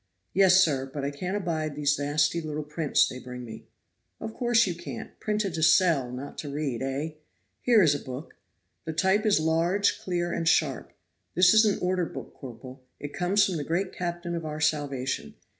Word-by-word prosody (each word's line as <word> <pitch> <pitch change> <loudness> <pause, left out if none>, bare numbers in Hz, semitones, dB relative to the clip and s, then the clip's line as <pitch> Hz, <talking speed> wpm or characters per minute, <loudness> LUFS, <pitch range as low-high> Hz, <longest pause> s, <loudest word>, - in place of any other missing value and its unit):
"Yes, 190 -1 +6
sir; 135 -5 -1
but 140 -1 -4
I 140 - -1
can't 180 +7 -3
abide 160 -6 -2
them 150 0 -6
nasty 150 +3 +1
little 155 -1 -4
prints 150 0 +1
they 130 - -7
bring 125 -1 -8
me." 110 - -10 0.5
"Of 220 - -6
course 240 -2 +3
you 180 - -2
can't. 170 - -8
Printed 210 -3 -1
to 160 - -3
sell, 160 -6 +4
not 130 +3 -7
to 145 - -5
read, 140 -4 -3
eh? 135 +4 -2 0.5
Here 230 -5 +5
is 150 -4 +4
a 145 - -2
book. 130 +5 -8 0.5
The 160 - -3
type 190 +6 +2
is 205 - +4
large, 165 +5 +1
clear 175 -1 -2
and 165 -1 -2
sharp. - - +1 0.4
This 180 0 +6
is 220 0 +6
an 210 - +2
order 180 -1 +1
book, - - -9
corporal. 130 0 -11 0.2
It 145 0 -7
comes 195 +3 +2
from 185 -3 -2
the 150 - -3
great 180 +5 -2
Captain 175 -1 -4
of 170 -1 -3
our 155 -1 -5
salvation. 140 -4 -1
160 Hz, 190 wpm, -27 LUFS, 145-185 Hz, 0.5 s, Yes